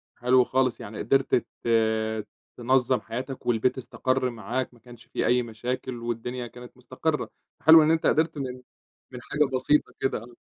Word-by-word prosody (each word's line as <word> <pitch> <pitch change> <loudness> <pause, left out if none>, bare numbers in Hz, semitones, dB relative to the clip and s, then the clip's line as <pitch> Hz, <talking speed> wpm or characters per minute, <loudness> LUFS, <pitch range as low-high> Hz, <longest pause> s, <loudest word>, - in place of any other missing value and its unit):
حلو 125 +1 +4
خالص، 130 -1 0
يعني 105 +1 -8
قدرت 135 +5 +2
ت 120 - -1 1.1
تنظم 130 +1 +2
حياتك 130 +3 -6
والبيت 120 +2 +1
استقر 130 0 -1
معاك، 120 +3 -4
ما 120 - -20
كانش 120 -1 -15
في - - -2
أي 125 0 +3
مشاكل 125 +3 -4
والدنيا 120 +1 -4
كانت 125 +1 -13
مُستقرة. 150 +4 -2 0.3
حلو 160 0 +8
إن 155 - +3
أنت 165 0 +1
قدرت 160 -1 +2
من 130 -2 -5 0.5
من 125 -1 -8
حاجة 150 +2 +1
بسيطة 145 +4 +2
كده 135 - 0
آه، 120 +2 -11
125 Hz, 160 wpm, -26 LUFS, 120-130 Hz, 1.1 s, حلو